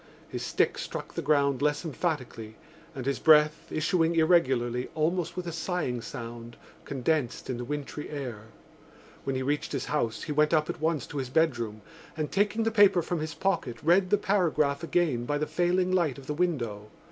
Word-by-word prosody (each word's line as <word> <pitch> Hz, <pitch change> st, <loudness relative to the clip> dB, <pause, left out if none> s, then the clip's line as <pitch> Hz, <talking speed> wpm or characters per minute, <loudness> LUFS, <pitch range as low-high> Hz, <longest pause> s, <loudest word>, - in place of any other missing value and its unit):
His -, -, -5 dB
stick -, -, +1 dB
struck -, -, -6 dB
the -, -, -3 dB
ground 140 Hz, -3 st, +2 dB
less 150 Hz, +3 st, +1 dB
emphatically 130 Hz, -9 st, -3 dB, 0.4 s
and 130 Hz, -2 st, -5 dB
his 140 Hz, 0 st, 0 dB
breath, 150 Hz, -1 st, +5 dB
issuing 165 Hz, +1 st, +1 dB
irregularly, 130 Hz, -7 st, +2 dB
almost 170 Hz, +3 st, 0 dB
with 180 Hz, -, -3 dB
a 170 Hz, -, -3 dB
sighing 160 Hz, -7 st, -2 dB
sound, 115 Hz, 0 st, -8 dB, 0.3 s
condensed 135 Hz, -1 st, -1 dB
in 125 Hz, -, -3 dB
the 125 Hz, -, -4 dB
wintry 145 Hz, +2 st, -5 dB
air. 125 Hz, -8 st, -6 dB, 0.8 s
When 135 Hz, -, -1 dB
he 130 Hz, -, -1 dB
reached 145 Hz, +2 st, -1 dB
his -, -, -2 dB
house 115 Hz, -7 st, -1 dB
he 155 Hz, -, -4 dB
went 150 Hz, +2 st, +3 dB
up 155 Hz, -1 st, +1 dB
at -, -, -11 dB
once 160 Hz, -4 st, 0 dB
to 145 Hz, -, -5 dB
his 130 Hz, -2 st, -3 dB
bedroom 120 Hz, -8 st, 0 dB, 0.3 s
and, 155 Hz, -1 st, -2 dB
taking 205 Hz, +3 st, +1 dB
the 225 Hz, -, +1 dB
paper 205 Hz, -5 st, +5 dB
from 175 Hz, 0 st, -2 dB
his 155 Hz, 0 st, -4 dB
pocket, 170 Hz, -9 st, -1 dB
read 180 Hz, +4 st, +4 dB
the 205 Hz, -, +4 dB
paragraph 165 Hz, -8 st, +1 dB
again 160 Hz, -8 st, 0 dB
by 145 Hz, +3 st, 0 dB
the 150 Hz, -, -1 dB
failing 180 Hz, +2 st, +1 dB
light 170 Hz, -8 st, +1 dB
of 135 Hz, -, -11 dB
the 150 Hz, -, -3 dB
window. 120 Hz, -11 st, -2 dB
150 Hz, 185 wpm, -28 LUFS, 130-170 Hz, 0.8 s, breath